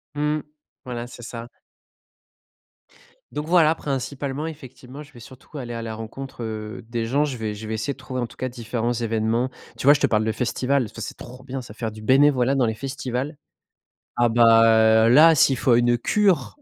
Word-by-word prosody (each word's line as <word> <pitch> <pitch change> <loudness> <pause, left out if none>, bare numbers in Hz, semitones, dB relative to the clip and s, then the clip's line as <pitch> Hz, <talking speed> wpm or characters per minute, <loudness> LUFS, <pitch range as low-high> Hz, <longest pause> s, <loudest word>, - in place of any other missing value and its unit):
Mmh. 150 +1 0 0.4
Voilà, 120 -1 -5
c'est 120 - -12
ça. 115 0 -7 1.8
Donc, 150 +1 -5
voilà, 165 -2 +4
principalement, 140 0 -4
effectivement, 140 -2 -10
je 145 - -19
vais 120 - -13
surtout 130 +5 -13
aller 120 -3 -6
à 115 - -5
la 110 -1 -5
rencontre, 120 +3 -8
heu, 110 0 -6
des 115 -1 -2
gens. 140 +6 +1
Je 135 -4 -3
vais 110 -1 -3
je 110 - -9
vais 110 0 -3
essayer 140 +6 -2
de - - -21
trouver, 130 -1 -6
en 120 - -2
tout - - -17
cas, 130 - -3
différents 120 -1 -3
événements. 115 +1 -1 0.3
Tu - - -6
vois, 145 - +9
je 150 - -1
te - - +4
parle 110 -1 +1
de 110 - +1
festivals, 130 +3 0
parce 110 - -8
que - - -10
c'est - - -6
trop 125 +1 -11
bien, 135 0 -5
ça, 105 - -11
faire 110 -1 -4
du 110 - -11
bénévolat 135 +2 +3
dans 130 - +2
les 110 - 0
festivals. 135 +3 -4 0.8
Ah, 120 0 +3
bah, 115 -1 +5
là, 155 +7 +7
s'il 135 -3 +4
faut 120 0 +2
une 120 0 +3
cure 165 - +1
125 Hz, 200 wpm, -23 LUFS, 115-140 Hz, 1.8 s, vois